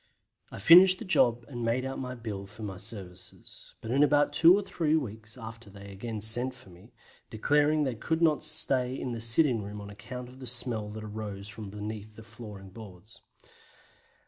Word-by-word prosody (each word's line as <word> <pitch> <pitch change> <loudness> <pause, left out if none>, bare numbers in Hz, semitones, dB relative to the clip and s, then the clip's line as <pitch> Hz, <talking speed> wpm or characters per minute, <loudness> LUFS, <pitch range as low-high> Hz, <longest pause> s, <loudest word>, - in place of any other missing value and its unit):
I - - -8
finished 180 - +7
the 225 - -8
job 120 -10 +2
and 120 -4 -6
made 120 +3 0
out 135 - -4
my 125 -1 -5
bill 105 -5 -6
for 110 +2 -12
my 95 -3 -5
services, 95 -3 -9
but 110 - -6
in 135 +3 +3
about 145 0 +3
two 170 +5 +6
or 205 - -2
three 160 -5 0
weeks 110 -5 -4
after 115 -2 -10
they 100 0 -12
again 110 +2 -6
sent 120 +4 +3
for 120 -7 -16
me, 85 +1 -17 0.4
declaring 150 +6 +2
they 130 -3 -1
could 160 +8 -2
not 160 -3 +2
stay 130 0 0
in 125 - -4
the 115 -1 -4
sitting 115 +1 +4
room 105 +1 -7
on 100 0 -9
account 120 +5 -8
of 130 +1 -15
the 130 - -8
smell 120 -3 0
that 110 +1 -8
arose 105 -2 -7
from 105 -2 -8
beneath 105 +1 -7
the 115 - -12
flooring 105 -4 -11
boards. 105 -1 -13
115 Hz, 195 wpm, -29 LUFS, 105-130 Hz, 0.4 s, finished